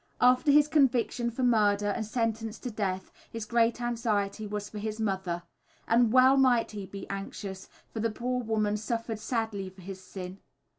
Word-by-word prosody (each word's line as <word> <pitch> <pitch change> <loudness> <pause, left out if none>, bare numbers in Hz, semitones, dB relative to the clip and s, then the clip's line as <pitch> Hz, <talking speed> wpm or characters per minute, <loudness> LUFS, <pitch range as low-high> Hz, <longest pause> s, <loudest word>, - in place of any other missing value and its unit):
After 250 +4 +4
his 295 +1 +6
conviction 255 -5 +2
for 235 +3 -3
murder 210 -4 +3
and 220 +2 -1
sentence 225 0 -2
to 250 - -4
death, 190 -3 -3 0.2
his 230 -2 -5
great 235 +1 +2
anxiety 220 -3 -1
was 205 0 -4
for 210 - -7
his 215 +1 -4
mother. 190 -5 -1 0.4
And 230 -1 +4
well 260 +2 +6
might 250 -4 +4
he 205 -3 -6
be 195 0 -8
anxious, 195 0 -6 0.2
for 225 - -4
the 225 +1 +1
poor 250 +3 -2
woman 215 -2 0
suffered 225 0 -3
sadly 220 -4 -2
for 185 0 -16
his 190 0 -8
sin. 185 0 -8
220 Hz, 175 wpm, -29 LUFS, 200-240 Hz, 0.4 s, his